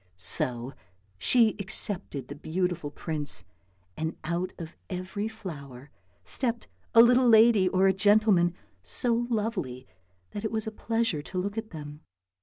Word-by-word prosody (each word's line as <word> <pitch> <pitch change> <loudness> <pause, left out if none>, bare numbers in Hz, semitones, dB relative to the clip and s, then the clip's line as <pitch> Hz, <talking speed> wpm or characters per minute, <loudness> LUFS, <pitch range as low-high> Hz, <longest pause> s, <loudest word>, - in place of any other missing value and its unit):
So 125 - -2 0.5
she 230 - +4
accepted 195 - -3
the - - -6
beautiful 170 +1 -2
prince, 145 - -2 0.5
and 160 +1 -3
out 175 +3 -2
of 165 -2 -8
every 190 +3 -3
flower 145 - -9 0.3
stepped 235 - -1 0.3
a 230 - +10
little 250 +1 +5
lady 220 -4 +6
or 185 +1 +2
a 190 - +5
gentleman 200 -3 +4 0.3
so 235 - +1
lovely 200 - -2 0.5
that 205 - -6
it 220 - -2
was 220 -1 -1
a 220 - -4
pleasure 225 -7 -1
to 185 - -8
look 200 +3 -2
at 225 -1 -4
them. 150 -1 -9
185 Hz, 140 wpm, -28 LUFS, 150-220 Hz, 0.5 s, a